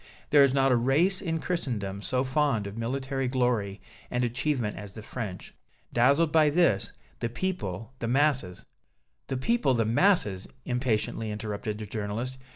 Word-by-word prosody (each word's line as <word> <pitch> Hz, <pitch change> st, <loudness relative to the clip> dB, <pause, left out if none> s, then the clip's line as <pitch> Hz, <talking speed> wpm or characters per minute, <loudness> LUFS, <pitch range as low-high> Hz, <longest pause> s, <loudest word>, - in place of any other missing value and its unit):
There 145 Hz, -1 st, +8 dB
is 140 Hz, -, +4 dB
not 135 Hz, 0 st, +3 dB
a -, -, +5 dB
race 145 Hz, +11 st, +2 dB
in 165 Hz, -4 st, -1 dB
Christendom 110 Hz, -, -3 dB
so 125 Hz, +5 st, 0 dB
fond 135 Hz, -5 st, +1 dB
of 100 Hz, 0 st, -6 dB
military 135 Hz, +3 st, -2 dB
glory 120 Hz, -6 st, 0 dB, 0.3 s
and 125 Hz, 0 st, 0 dB
achievement 125 Hz, -2 st, -1 dB
as 100 Hz, -2 st, -8 dB
the 110 Hz, -, -8 dB
French. 105 Hz, -6 st, -6 dB, 0.4 s
Dazzled 140 Hz, +7 st, +4 dB
by 155 Hz, -1 st, +5 dB
this, 150 Hz, -, +2 dB, 0.3 s
the -, -, -1 dB
people, 115 Hz, -, -4 dB
the 115 Hz, -, -2 dB
masses 130 Hz, -8 st, +1 dB, 0.3 s
" -, -, -49 dB
"The 130 Hz, -, -2 dB
people, 140 Hz, -, +2 dB
the 115 Hz, -2 st, +2 dB
masses!" 110 Hz, -, +2 dB, 0.2 s
impatiently 120 Hz, -3 st, -1 dB
interrupted 105 Hz, 0 st, -4 dB
the 110 Hz, -, -6 dB
journalist. 110 Hz, +5 st, -4 dB
125 Hz, 160 wpm, -28 LUFS, 105-140 Hz, 0.4 s, There